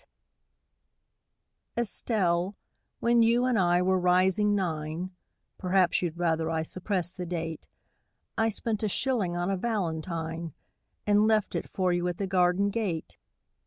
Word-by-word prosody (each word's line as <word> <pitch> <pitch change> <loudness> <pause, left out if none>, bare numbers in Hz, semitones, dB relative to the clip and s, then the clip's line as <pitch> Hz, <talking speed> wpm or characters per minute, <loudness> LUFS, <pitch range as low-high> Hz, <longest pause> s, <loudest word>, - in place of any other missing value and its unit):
] - - -52
ESTELLE, 195 -5 +1 0.5
when 235 0 +4
you 235 +2 +4
and 250 -4 +2
I 175 0 +3
were 185 0 +2
rising 185 +3 +3
nine 165 -1 -3 0.5
Perhaps 185 -1 +2
you'd 170 -2 -3
rather 165 -2 0
I 160 -1 0
suppressed 180 0 -2
the 180 - -4
date 165 -2 -4 0.7
I 225 0 +2
spent 220 0 -2
a 215 - 0
shilling 205 -7 0
on 175 +2 -1
a 195 - 0
valentine 165 - -3 0.5
And 210 +1 +4
left 215 -2 +2
it - - -3
for 185 -2 0
you 175 0 0
at 175 -1 -3
the 200 - -2
garden 185 +1 +2
gate. 195 -8 -3
185 Hz, 140 wpm, -28 LUFS, 170-210 Hz, 0.7 s, when